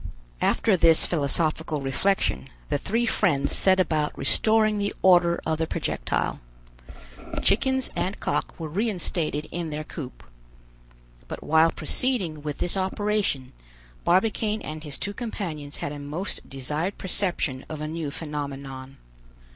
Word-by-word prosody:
After 215 - +3
this 165 -2 +6
philosophical 155 0 0
reflection, 135 +4 0 0.2
the 145 -1 +1
three 230 +9 0
friends 175 -11 +2
set 190 -1 +4
about 155 -4 +1
restoring 215 -1 +3
the 200 0 -1
order 175 -2 +5
of 160 -1 0
the 160 - 0
projectile. - - -1 1.0
Chickens 265 +4 +2
and 190 +2 -1
cock - - -2
were 160 - -3
reinstated 170 -5 -1
in 170 -2 -3
their 155 0 -3
coop. 145 -4 -8 1.0
But - - -6
while 160 +2 +5
proceeding 190 - 0
with 150 -1 -4
this 175 - +1
operation, 190 -7 0 0.5
Barbicane 210 +4 +2
and 155 0 -6
his 145 -3 -5
two 200 +2 -3
companions 175 - -5
had 145 - -3
a 145 - -6
most 150 +7 -4
desired 150 +8 -3
perception 175 -8 -1
of 155 - -5
a 155 - -3
new 160 -1 -3
phenomenon. 140 -3 -6
165 Hz, 130 wpm, -26 LUFS, 150-195 Hz, 1.0 s, this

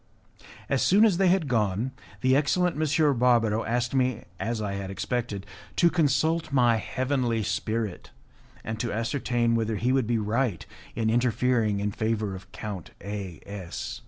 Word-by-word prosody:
As 135 - +1
soon 205 +4 +5
as 200 -6 +3
they 195 0 +3
had 180 -3 +3
gone, 110 0 0 0.3
the 130 0 +4
excellent 175 +4 +2
M. 150 -3 +2
Barbaro 115 -3 +3
asked 120 +2 -1
me, 130 -4 +1 0.2
as 115 0 -2
I 105 -2 -2
had 100 -1 -4
expected, 100 0 -3 0.3
to 170 -1 +4
consult 160 0 +1
my 120 -4 +4
heavenly 125 -1 -1
spirit, 110 -1 -2 0.5
and 110 0 -4
to 120 - -2
ascertain 120 +1 0
whether 115 -1 0
he 120 +5 +1
would 130 -4 +1
be 120 0 +1
right 110 - -1 0.3
in 110 -1 +1
interfering 120 -3 +2
in 105 +1 -1
favour 110 -1 -1
of 95 +1 -12
Count 100 -6 -6
A 100 -5 -6
S 100 -4 -6
115 Hz, 160 wpm, -27 LUFS, 105-130 Hz, 0.5 s, soon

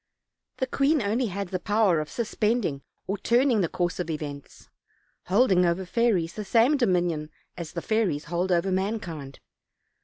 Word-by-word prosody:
The 260 - 0
queen 280 +4 +2
only 230 +3 0
had 200 -1 -4
the 185 - -2
power 205 -3 +2
of 155 0 -4
suspending 215 - -1 0.2
or 200 +1 -3
turning 240 -2 +3
the 170 - 0
course 175 0 -2
of 175 -2 -3
events; 145 -3 -7 0.6
holding 190 -2 +4
over 175 +2 0
fairies 185 -5 +1
the 215 - -5
same 230 +8 +4
dominion 175 - +1 0.3
as 170 -2 -7
the 170 - -4
fairies 210 -10 0
hold 175 +3 -2
over 175 +2 +2
mankind. 185 -8 -3
190 Hz, 155 wpm, -26 LUFS, 170-225 Hz, 0.6 s, holding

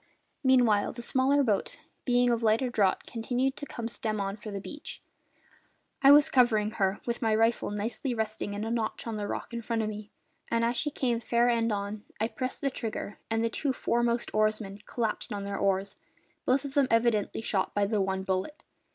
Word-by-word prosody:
Meanwhile, 245 -6 +4
the 240 - -6
smaller 270 +3 +3
boat, 210 -6 0 0.3
being 245 -1 +3
of 235 -1 +1
lighter 230 +3 +2
draught, 200 -5 +2
continued 250 +3 -1
to 290 - -6
come 235 -3 -5
stem 220 -2 -3
on 195 0 -2
for 215 0 -9
the 200 -1 -4
beach. 295 +9 -8 1.0
I 275 - +7
was 290 0 +8
covering 220 -5 +3
her, 195 -2 0
with 235 +1 -2
my 220 -2 +2
rifle 225 +2 +2
nicely 225 +5 -3
resting 215 -2 -3
in 205 - -3
a 225 - -2
notch 225 -2 -2
of 230 -2 -3
the 205 -1 -3
rock - - -5
in 235 - -3
front 230 0 -1
of 215 - -1
me, 210 0 -7 0.4
and 230 0 +2
as 235 +1 0
she 295 - 0
came 245 -5 0
fair 235 +1 +2
end 230 -1 +2
on 205 +1 -3 0.2
I 220 +2 +1
pressed 255 +1 -4
the 275 - 0
trigger, 220 -4 -5
and 225 0 +1
the 230 - +1
two 275 +1 -1
foremost 235 -1 0
oarsmen 215 -2 0
collapsed 225 -3 -2
on 200 -1 -3
their 200 0 -3
oars, 195 0 0 0.5
both 260 +2 +2
of 275 - -6
them 280 -2 +3
evidently 230 -2 +2
shot 195 -4 -1
by 205 0 +3
the 210 0 +1
one 190 0 -1
bullet. 190 - -2
225 Hz, 205 wpm, -29 LUFS, 210-245 Hz, 1.0 s, was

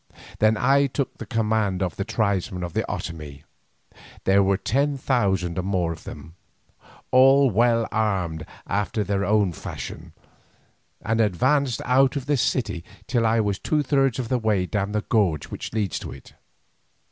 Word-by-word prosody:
Then 110 +1 +4
I 140 +4 +3
took 135 0 -4
command 110 -4 0
of 90 -3 -3
the 100 - -2
tribesmen 95 -4 -1
of 85 -2 -5
the - - 0
Otomie—there 75 +5 -4
were 95 0 +2
ten 140 +7 0
thousand 95 -10 0
or - - +1
more 90 -3 -1
of 80 - -9
them, 80 - -9 0.8
all 135 +1 +6
well 115 +2 +2
armed 95 -8 -1 0.2
after 105 +2 -1
their 100 -1 -1
own 105 -2 +2
fashion—and 115 +7 -7
advanced 130 - +1
out 130 +2 +3
of 140 -3 -3
the 145 0 +1
city 120 -8 -1 0.2
till 120 -3 +1
I 110 0 +3
was 100 -2 -1
two 150 -1 0
thirds 135 -2 +2
of 125 -3 -3
the 125 - +1
way 105 -5 +1
down 100 +1 -2
the 105 0 0
gorge 95 -10 0
which - - -6
leads 105 -6 -1
to - - -7
it. 65 - -14
110 Hz, 155 wpm, -24 LUFS, 95-125 Hz, 0.8 s, all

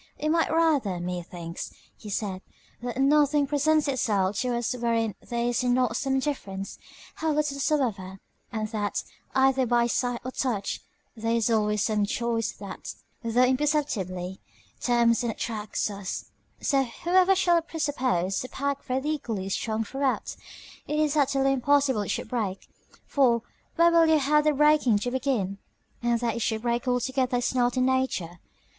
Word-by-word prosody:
It 305 - -1
might 330 +1 +2
rather, 295 - +2
methinks, 175 -1 -5 0.2
he 210 - -10
said, 195 -2 -3 0.4
that 245 0 -4
nothing 290 +1 +4
presents 295 +2 +2
itself 205 -7 +1
to 250 -1 0
us 240 +1 -1
wherein 230 -3 0 0.2
there 235 -1 -1
is 240 +1 0
not 245 -2 +2
some 270 +1 0
difference, 200 -9 -4 0.4
how 320 0 0
little 295 -2 0
soever; 215 - -1 0.3
and 215 -1 -2
that, 210 -2 -2 0.3
either 265 -1 +3
by 240 0 +3
the 235 - 0
sight 245 0 0
or 255 - -3
touch, 240 -7 -2 0.3
there 230 +1 0
is 230 0 +1
always 210 -2 +2
some 210 -2 +1
choice 230 0 -1
that, 200 - -8 0.3
though 230 - -2
it 245 +3 +4
be - - +2
imperceptibly, 215 - -1 0.4
tempts 235 -1 +3
and 235 -2 -1
attracts 215 -2 -3
us; 195 -2 -6 0.3
so, 275 -2 +2 0.2
whoever 370 +2 +4
shall 345 -3 +3
presuppose 255 - -1
a 255 - -7
packthread 275 -1 -2
equally 230 -11 -2
strong 220 +2 -1
throughout, 270 +4 -2 0.5
it 300 - -1
is 305 -1 +2
utterly 270 -2 +3
impossible 270 -2 +2
it 205 - -4
should - - -2
break; 210 -6 -3 0.4
for, 240 -5 +2 0.3
where 340 +1 +5
will 335 -1 +5
you 320 -1 +5
have 300 +1 +3
the 305 - +5
breaking 295 -6 +4
to 245 +4 -2
begin? 240 -7 -1 0.4
and 235 -1 +1
that 235 -2 0
it - - -3
should 220 0 -1
break 240 +1 -1
altogether 250 0 +1
is 245 +1 0
not 245 0 +1
in 255 - +3
nature. 260 -10 -1
245 Hz, 165 wpm, -27 LUFS, 215-280 Hz, 0.5 s, where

